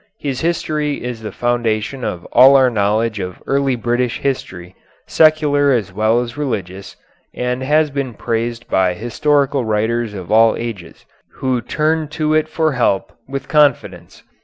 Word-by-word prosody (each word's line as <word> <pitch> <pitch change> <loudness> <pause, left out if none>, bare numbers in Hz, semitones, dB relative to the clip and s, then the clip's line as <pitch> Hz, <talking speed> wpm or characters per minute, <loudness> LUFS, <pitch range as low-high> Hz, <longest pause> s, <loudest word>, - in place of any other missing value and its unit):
His 135 -3 -4
history 155 -4 -1
is 120 -2 -5
the 110 - -6
foundation 120 +1 -1
of 90 -5 -4
all 130 +3 +7
our 130 -2 +5
knowledge 110 +1 0
of 90 -1 -6
early 135 -1 +1
British 120 +1 -1
history, 95 -9 -4 0.3
secular 150 -3 +3
as 105 -7 -1
well 110 +4 +2
as 120 -1 -6
religious, 100 -9 -4 0.4
and 125 +1 -2
has 150 +2 +2
been 135 -4 -4
praised 115 +1 -3
by 95 -1 +1
historical 140 +5 0
writers 110 0 -1
of 95 -2 -8
all 110 +1 +5
ages, 115 -7 -7 0.3
who 130 -2 -1
turned 155 +3 -1
to 155 -1 0
it 155 0 +2
for 160 0 0
help 120 -7 0
with 135 +1 -5
confidence. 150 -6 0
120 Hz, 150 wpm, -18 LUFS, 110-145 Hz, 0.4 s, all